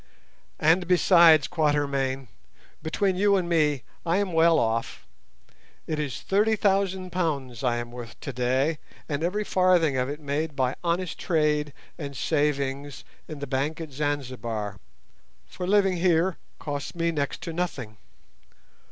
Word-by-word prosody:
And 165 +3 +3
besides, 170 -4 +6
Quatermain, 140 -5 0 0.5
between 185 +4 0
you 200 +2 +3
and 185 -3 0
me, 150 -6 +1 0.2
I 170 +1 +1
am 200 -3 -1
well 165 0 +5
off; 115 0 -1 0.8
it 155 -1 -3
is 145 -5 -3
thirty 210 +3 +2
thousand 190 -2 0
pounds 140 -9 -2
I 120 -2 +2
am 120 0 -5
worth 120 -2 -9
today, 130 +4 0 0.3
and 145 0 -2
every 200 +5 0
farthing 180 -8 +3
of 130 +1 0
it 145 +1 -5
made 150 +1 -3
by 130 -1 +1
honest 175 0 -1
trade 150 -3 +1 0.3
and 140 -3 -6
savings 140 -2 -1 0.2
in 155 - -7
the 140 - -5
bank 140 +4 -2
at 160 -3 -7
Zanzibar, 125 -8 -3 0.7
for 180 - -6
living 195 -2 +3
here 175 0 +2 0.2
costs 145 +1 -5
me 170 0 0
next 145 -3 -3
to 165 - -5
nothing. 135 -11 -4
150 Hz, 140 wpm, -26 LUFS, 135-175 Hz, 0.8 s, besides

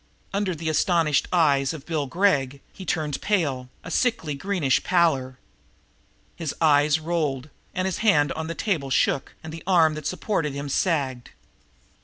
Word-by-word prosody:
Under 195 -3 -1
the 160 +1 -6
astonished 155 -2 +2
eyes 145 -5 +3
of 150 -3 -9
Bill 155 -4 -2
Gregg 140 -5 +1
he 190 - -9
turned 150 -3 -1
pale, 140 -11 0
a - - -8
sickly 225 - 0
greenish 150 -3 0
pallor. 140 -8 +1 1.0
His 165 -4 -4
eyes 150 -1 +4
rolled, 155 -4 -2 0.2
and 185 0 0
his 190 - -2
hand 150 -10 +3
on 160 0 -4
the 165 - -4
table 160 -10 -1
shook, 135 0 0
and 160 0 -8
the 165 - -8
arm 165 -4 +4
that 155 -1 -5
supported 180 -5 -2
him 140 0 -5
sagged. 135 -7 -1
155 Hz, 155 wpm, -24 LUFS, 140-175 Hz, 1.0 s, eyes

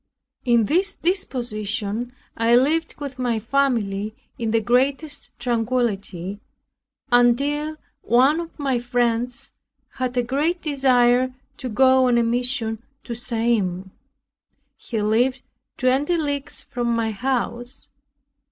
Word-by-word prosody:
In 235 -3 +4
this 370 - +1
disposition, 235 - -2 0.2
I 230 +1 +3
lived 310 +6 +2
with 275 -3 -6
my 240 -3 0
family 220 -4 0 0.2
in 230 -2 -2
the 225 +1 +3
greatest 270 +7 0
tranquility, 225 -6 -1 0.7
until 280 +6 +2 0.2
one 265 +7 +4
of 335 -1 -7
my 270 -4 0
friends 240 0 -1 0.4
had 255 -1 -2
a 245 - +3
great 295 +8 0
desire 255 -4 +3 0.2
to 260 - -5
go 260 +2 +4
on 240 -1 +3
a 235 - +3
mission 235 -1 -1 0.2
to 240 - -5
Siam. 225 -6 -1 0.8
He 225 - -4
lived 245 +5 +1 0.3
twenty 275 +7 +2
leagues 285 -3 -2
from 240 -1 -3
my 225 -1 0
house. 245 +2 -3
245 Hz, 115 wpm, -22 LUFS, 230-270 Hz, 0.8 s, In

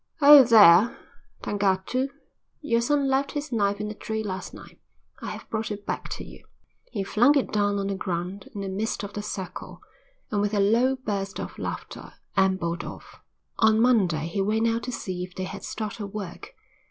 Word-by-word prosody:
"Oh, 290 -1 +10
there, 215 -3 +7 0.5
Tangatu, 205 +6 0 0.5
your 235 -6 +1
son 280 +3 +1
left 270 +1 0
his 295 0 -4
knife 205 -3 +1
in 210 0 -3
a - - -5
tree 220 +1 -4
last 190 -2 -5
night. - - -13 0.4
I - - -5
have - - -8
brought 220 0 -2
it 205 -1 -6
back - - -4
to - - -7
you." - - -13 0.5
He 205 -5 -2
flung 245 +9 +4
it 270 - -1
down 205 -1 +1
on 200 - -2
the 200 - -1
ground 185 0 -4
in 200 - -4
the 195 - -4
midst 205 +3 -3
of 200 0 -7
the 205 - -4
circle, 190 -3 -7 0.5
and 205 -2 +1
with 205 +1 0
a - - +2
low 235 +6 +3
burst 200 -6 -4
of - - -7
laughter - - -6 0.2
ambled 185 -3 +1
off. - - -10 0.4
On 220 -1 +4
Monday 195 -11 +3
he 170 +4 -2
went 215 +3 +1
out 230 0 0
to 250 - -4
see 185 -6 -4
if 180 0 -9
they 185 - -4
had 185 - -7
started 215 -1 -5
work. 200 - -8
205 Hz, 190 wpm, -25 LUFS, 195-230 Hz, 0.5 s, Oh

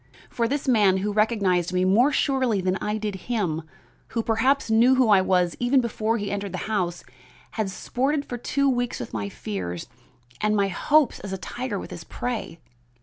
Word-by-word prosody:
For 235 -1 0
this 280 +3 -2
man, 205 -7 +4
who 210 - -1
recognized 200 -5 +1
me 185 0 +2
more 230 +10 +4
surely 260 -7 +1
than 185 0 0
I 210 +1 -2
did 210 -1 -3 0.2
him, 185 -10 0 0.5
who 230 - -2
perhaps 230 +3 +1
knew 240 +4 +5
who 255 -3 +3
I 200 -2 +6
was 180 -2 +2
before 235 -3 +1
he 205 -2 -3
ever - - -1
entered 190 - -10
my - - -2
house, 180 -5 -2 0.5
has 210 -3 -2
sported 280 +8 -1
for 245 - -6
two 280 +3 0
weeks 245 -2 0
with 120 - -7
my 100 -2 -3
fears 90 -4 -5 0.6
and 210 -1 +2
hopes 235 +9 +2
as 195 -1 -6
a - - -2
tiger 245 +2 -4
with - - -7
his 170 - -7
prey. 225 -6 -5
215 Hz, 185 wpm, -25 LUFS, 185-245 Hz, 0.6 s, I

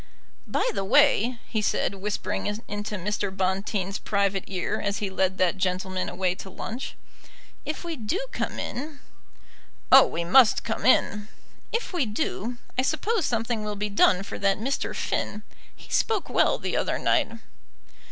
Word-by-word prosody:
"By - - 0
the - - -1
way," 245 +1 +4
he 220 - -1
said, 205 - 0
whispering 200 +1 -3
into 210 0 -4
Mr. 205 +1 -2
Bonteen's 195 +1 -1
private 200 -2 0
ear 185 -3 -2
as 200 0 -1
he 200 -2 -3
led 190 0 0
that 185 +1 +2
gentleman 185 0 -1
away 180 0 0
to 190 +1 -9
lunch, 230 +7 -6 0.7
"if 310 - -4
we 340 -1 -4
do 245 - -2
come - - -3
in 285 +3 -5 0.4
" - - -30
"Oh, - - +9
we 170 - -3
must 215 +5 +5
come 225 +1 -2
in." 210 -4 +3 0.4
"If 460 -3 -2
we 330 -9 +1
do, 220 +2 -2 0.2
I - - +6
suppose 340 - 0
something 230 -1 -1
will 210 0 -3
be 210 +1 -2
done 195 -2 +4
for - - -7
that 195 -1 +2
Mr. 265 +6 -2
Finn. 210 +1 -2 0.3
He - - -16
spoke 435 -4 +1
well - - +3
the - - -3
other - - 0
night." 285 -8 +2
210 Hz, 160 wpm, -26 LUFS, 195-245 Hz, 0.7 s, Oh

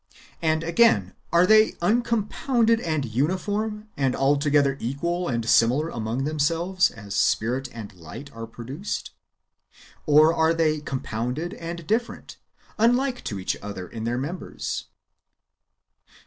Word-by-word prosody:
And, 160 -1 +1
again, 165 - +3 0.2
are 170 +2 +5
they 215 +2 +5
uncompounded 230 +3 +1
and 155 - -1
uniform, 205 - -1
and 135 -2 0
altogether 140 0 +2
equal 170 +8 -2
and 115 -4 -2
similar 125 +9 +4
among 115 0 -3
themselves, 165 +5 +1
as 100 -3 -9
spirit 125 +4 +1
and 110 -4 -8
b'ght 90 - -11
are 115 0 -6
produced; 130 - -6 1.0
or 155 +2 +6
are 160 0 +2
they 155 -2 +2
compounded 130 +4 -3
and 170 0 -7
different, 230 +7 -2 0.4
unlike 245 +3 +2
[to 100 - -3
each 95 - -1
other] 100 -3 -6
in 110 +3 -7
their 120 +1 -1
members. 150 +8 -4
155 Hz, 120 wpm, -25 LUFS, 120-180 Hz, 1.0 s, or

